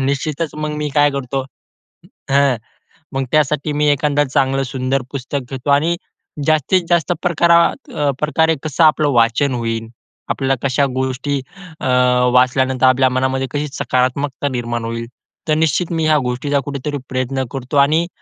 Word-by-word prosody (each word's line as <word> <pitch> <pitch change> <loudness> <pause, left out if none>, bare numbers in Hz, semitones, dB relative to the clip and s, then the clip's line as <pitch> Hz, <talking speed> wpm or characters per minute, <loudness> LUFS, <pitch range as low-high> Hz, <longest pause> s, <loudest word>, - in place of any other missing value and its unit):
निश्चितच 140 +4 -2
मग 155 0 -3
मी 150 0 -2
काय 145 0 +4
करतो 135 -1 -3 0.9
हं, 140 -2 +4 0.6
मग 135 0 -1
त्यासाठी 150 0 +1
मी 150 0 +1
एखादा 145 0 +1
चांगलं 135 0 +1
सुंदर 130 +1 -1
पुस्तक 140 +1 -3
घेतो 135 +1 -5
आणि 150 +5 +3 0.5
जास्तीत 155 +4 +2
जास्त 170 -4 +2
प्रकारा 170 - +2
प्रकारे 160 +2 +2
कसं 155 +1 +1
आपलं 155 -1 +4
वाचन 120 +3 +2
होईल, 115 -2 -3 0.4
आपल्याला 135 -1 0
कशा 140 +2 +2
गोष्टी 130 +2 -1 0.4
अ, - - -3 0.5
वाचल्यानंतर 130 +1 +3
आपल्या 130 0 +4
मनामध्ये 130 +1 0
कशी 145 +1 -2
सकारात्मकता 130 +2 0
निर्माण 120 -2 -3
होईल. 115 0 -4 0.4
तर 155 - +2
निश्चित 165 +3 -1
मी 160 -1 0
ह्या 155 -1 +4
गोष्टीचा 140 +3 -1
कुठेतरी 145 +1 -4
प्रयत्न 130 +1 -1
करतो. 135 +1 -4
आणि 160 +3 +1
140 Hz, 140 wpm, -18 LUFS, 130-150 Hz, 0.9 s, काय